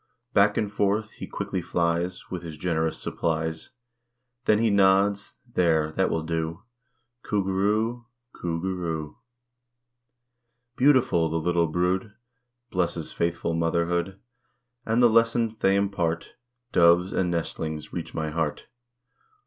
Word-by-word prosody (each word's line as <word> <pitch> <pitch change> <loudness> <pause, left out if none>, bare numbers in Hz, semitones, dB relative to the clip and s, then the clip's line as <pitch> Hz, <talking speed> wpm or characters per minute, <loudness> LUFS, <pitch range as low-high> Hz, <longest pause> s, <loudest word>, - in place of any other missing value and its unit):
Back 100 0 +4
and 105 -1 -1
forth 105 +2 0
he - - -8
quickly 95 - -3
flies 85 +2 -1
With 90 -2 -4
his 80 -3 -8
generous 80 -1 -1
supplies, 80 -1 -2 0.8
Then 105 - +4
he 115 0 +2
nods, 100 +1 +3 0.2
"There, 80 -3 +2
that 95 +4 +1
will 80 - -1
do 80 +3 -3 0.6
Coo 105 -2 0
goo 95 0 -2
roo 105 +4 +2
o - - -8
o, 120 - -22 0.3
Coo 85 -1 -3
goo 95 +2 -2
roo 80 -3 -2
o - - -8
o." - - -28 1.6
Beautiful, 125 - +4
the 80 - -1
little 85 0 +1
brood 90 +5 -1 0.6
Blesses 85 -3 -1
faithful 85 0 -1
motherhood, 85 +3 0 0.7
And 115 +2 +3
the - - +9
lessons 115 0 +3
they 95 0 +3
impart, 90 -5 -1 0.4
Doves 85 +2 +4
and 90 -2 +1
nestlings, 80 -2 -3
reach 85 -2 -5
my 80 -1 -2
heart. 80 -2 -2
90 Hz, 140 wpm, -26 LUFS, 80-100 Hz, 1.6 s, the